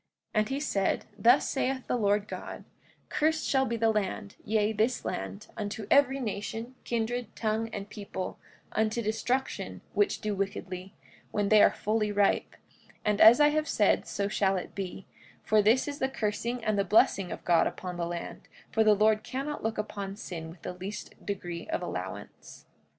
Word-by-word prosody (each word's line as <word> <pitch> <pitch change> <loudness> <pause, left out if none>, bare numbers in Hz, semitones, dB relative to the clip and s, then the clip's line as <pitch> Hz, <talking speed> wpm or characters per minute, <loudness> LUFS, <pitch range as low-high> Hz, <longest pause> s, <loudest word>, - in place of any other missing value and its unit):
45:16 215 - +3
And 215 - +1
he 270 +1 -1
said: 200 -10 0
Thus 235 +7 +5
saith 265 -1 -1
the - - 0
Lord 205 -2 +2
God—Cursed 315 +1 -3
shall 265 -1 +2
be 235 - -1
the 225 0 +3
land, 205 -1 -2
yea, 215 0 +1
this 220 +4 0
land, 95 0 -4
unto 210 0 -4
every 275 -1 +5
nation, 225 +1 -4
kindred, 235 0 -2
tongue, 220 0 -1
and 200 -2 -6
people, 200 -3 -6 0.3
unto 220 +2 0
destruction, 245 +5 -2
which 410 - +2
do 215 -2 -2
wickedly, 195 -1 -4 0.3
when 205 -1 0
they 215 -1 +7
are - - +8
fully 215 0 0
ripe; 205 -1 +2 0.5
and 210 -1 +2
as 230 +5 +9
I 295 0 +7
have 310 +1 0
said 210 -7 +2
so 200 0 -1
shall 195 -2 +1
it 180 - -6
be; 190 -1 -5 0.4
for 215 0 +4
this 225 +7 +3
is 285 0 -4
the 265 - +1
cursing 235 0 -2
and 215 -2 +1
the - - +3
blessing 195 -1 +3
of - - -7
God 170 -2 +4
upon 180 -1 -5
the 170 -1 -1
land, 170 0 -6 0.2
for 225 - +3
the 215 -1 +6
Lord 215 +1 +3
cannot 275 +6 -4
look 225 0 -2
upon 200 -2 -4
sin 165 -6 -7
with 165 +1 -14
the - - -4
least 190 +3 -7
degree 175 -4 -5
of 325 - -2
allowance. - - -7
215 Hz, 175 wpm, -29 LUFS, 200-240 Hz, 0.5 s, as